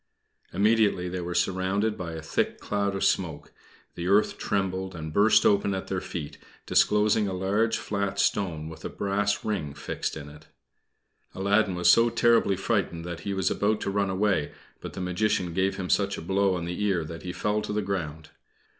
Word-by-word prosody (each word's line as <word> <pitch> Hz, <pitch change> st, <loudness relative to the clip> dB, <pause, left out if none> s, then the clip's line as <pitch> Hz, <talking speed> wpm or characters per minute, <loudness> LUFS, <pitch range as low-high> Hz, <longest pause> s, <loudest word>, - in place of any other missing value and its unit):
Immediately 105 Hz, -3 st, +2 dB
they 90 Hz, 0 st, -4 dB
were 85 Hz, 0 st, -4 dB
surrounded 95 Hz, +4 st, 0 dB
with 85 Hz, -2 st, -5 dB
a 80 Hz, -, -8 dB
thick 80 Hz, -, -1 dB
cloud 100 Hz, -1 st, -1 dB
of 95 Hz, -, -2 dB
smoke. 80 Hz, -6 st, -1 dB, 0.4 s
The 85 Hz, 0 st, -4 dB
earth 100 Hz, +3 st, +3 dB
trembled, 95 Hz, -2 st, -2 dB
and 80 Hz, -1 st, -6 dB
burst 105 Hz, +4 st, +5 dB
open 100 Hz, -1 st, +3 dB
at 95 Hz, -, -5 dB
their 95 Hz, -1 st, -1 dB
feet 75 Hz, -5 st, -6 dB, 0.3 s
disclosing 105 Hz, 0 st, +3 dB
a 95 Hz, -, -3 dB
large 100 Hz, +5 st, +1 dB
flat 100 Hz, -1 st, -2 dB
stone 85 Hz, -8 st, 0 dB
with 80 Hz, 0 st, -10 dB
a -, -, -4 dB
brass 100 Hz, +1 st, -1 dB
ring 80 Hz, -10 st, -2 dB
fixed -, -, -4 dB
in 75 Hz, -2 st, -8 dB
it. 75 Hz, +2 st, -14 dB, 0.9 s
Aladdin 100 Hz, 0 st, +2 dB
was 90 Hz, -1 st, +1 dB
so 115 Hz, +4 st, +5 dB
terribly 115 Hz, -4 st, +3 dB
frightened 95 Hz, -4 st, -1 dB
that 85 Hz, -1 st, -5 dB
he 100 Hz, -1 st, -4 dB
was 95 Hz, -1 st, +1 dB
about 105 Hz, +1 st, +1 dB
to 100 Hz, -, -2 dB
run 100 Hz, -1 st, 0 dB
away; 95 Hz, -5 st, +1 dB, 0.3 s
but -, -, -8 dB
the -, -, -6 dB
Magician 90 Hz, 0 st, 0 dB
gave 95 Hz, +2 st, 0 dB
him 90 Hz, -, -3 dB
such 100 Hz, -1 st, +1 dB
a -, -, -6 dB
blow 95 Hz, +2 st, +1 dB
on 85 Hz, -2 st, -3 dB
the 90 Hz, +4 st, -3 dB
ear 95 Hz, -5 st, +1 dB
that 85 Hz, +1 st, -8 dB
he 90 Hz, -, -5 dB
fell 105 Hz, +4 st, -1 dB
to -, -, -5 dB
the 105 Hz, 0 st, -1 dB
ground. 80 Hz, -6 st, -4 dB
95 Hz, 190 wpm, -27 LUFS, 90-105 Hz, 0.9 s, burst